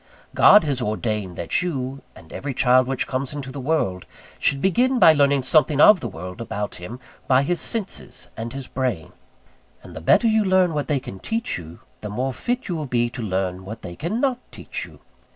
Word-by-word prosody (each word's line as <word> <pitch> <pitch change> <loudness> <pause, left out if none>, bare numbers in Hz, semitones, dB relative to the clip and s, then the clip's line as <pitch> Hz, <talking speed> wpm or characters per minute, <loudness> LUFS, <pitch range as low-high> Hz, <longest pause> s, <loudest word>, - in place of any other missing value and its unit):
God 210 - +7
has 140 -4 -1
ordained 105 -4 -2
that 85 - 0
you, 135 -6 -4
and - - -15
every 140 -2 -5
child 125 0 +4
which 135 -1 -1
comes 130 +1 -3
into 135 -2 -6
the 140 - -7
world, 125 - -1 0.3
should 140 - +2
begin 245 - +2
by 165 -9 +7
learning 140 -2 +2
something 150 +2 +3
of 205 +5 +8
the 120 - -4
world 90 0 -8
about 105 -2 -4
him 100 +8 -8 0.3
by 130 +1 +4
his 175 +2 0
senses 190 - -2
and 115 +1 -5
his 135 -1 -6
brain; 125 -13 -3 0.7
and - - -12
the 80 - -7
better 85 - +4
you 220 -1 +3
learn 185 -3 +3
what 145 -1 -2
they 145 -3 +1
can 95 -7 -9
teach 225 - -3
you, 80 0 -12 0.2
the 105 - -7
more 130 +6 -2
fit 245 - -3
you 180 - -2
will 155 -3 -4
be 120 -1 0
to 125 - -6
learn 95 -3 -2
what 110 +4 -9
they 85 - -7
cannot 240 - -1
teach - - -6
you. - - -17
130 Hz, 205 wpm, -22 LUFS, 110-160 Hz, 0.7 s, of